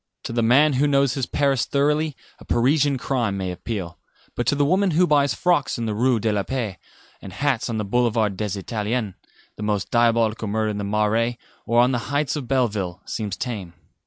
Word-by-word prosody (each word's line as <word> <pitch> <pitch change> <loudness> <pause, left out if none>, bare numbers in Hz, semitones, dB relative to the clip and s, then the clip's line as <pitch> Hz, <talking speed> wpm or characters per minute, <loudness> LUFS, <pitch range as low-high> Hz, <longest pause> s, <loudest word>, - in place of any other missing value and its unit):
To - - -5
the 120 - +1
man 140 +6 +4
who 140 +3 +2
knows 140 -3 +2
his 135 -3 -2
Paris 140 -3 +1
thoroughly 150 +1 +1 0.2
a - - -14
Parisian 140 +3 +2
crime 120 -6 -1
may 95 -1 -3
appeal; 90 -1 -5 0.3
but 120 - -3
to - - +3
the 145 0 +2
woman 190 +6 +2
who 180 - +5
buys 145 -6 +2
frocks 175 -6 +1
in 115 - -3
the 110 - -1
Rue 120 +2 +2
de 110 +1 0
la 100 - +1
Paix, 110 -6 -4 0.4
and 95 - -9
hats 130 +3 -1
on 115 - -2
the 105 - -2
Boulevard 110 -2 +1
des 105 -1 -3
Italiens, 105 +1 -2 0.4
the - - -8
most 105 -2 -1
diabolical 115 -2 +2
murder 110 +1 0
in 105 - -4
the - - -3
Marais, 105 +3 0 0.3
or 120 0 +3
on 125 +1 +3
the 125 - 0
heights 145 0 0
of 140 -5 -5
Belleville, 105 -9 -1
seems 105 -4 -4
tame. 100 -9 -5
120 Hz, 205 wpm, -23 LUFS, 105-140 Hz, 0.4 s, who